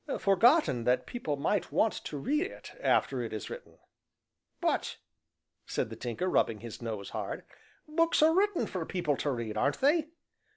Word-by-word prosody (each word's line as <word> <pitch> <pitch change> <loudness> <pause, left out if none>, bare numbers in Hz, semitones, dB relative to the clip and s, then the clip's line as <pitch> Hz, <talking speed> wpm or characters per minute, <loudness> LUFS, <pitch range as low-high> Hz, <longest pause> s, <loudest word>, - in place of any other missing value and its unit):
"Forgotten 195 - +4
that 125 +1 +2
people 155 -12 -3
might 185 +8 0
went 220 - +3
to 150 - -4
read 300 - 0
it - - -11
after 135 - +2
it 115 - -4
is 110 -2 -5
written." - - -9 0.8
"But," - - 0 0.7
said 110 - -2
the - - -5
Tinker, 120 +10 -3
rubbing 115 - +1
his 115 0 -8
nose 110 -4 -5
hard, - - -4 0.4
"books 330 0 +3
are 320 +1 +6
written 390 0 +2
for 185 -3 -4
people 165 -4 -1
to 145 - -1
read, 115 -5 -3
aren't 140 +6 +1
they?" 305 +3 +3
155 Hz, 165 wpm, -30 LUFS, -, 0.8 s, are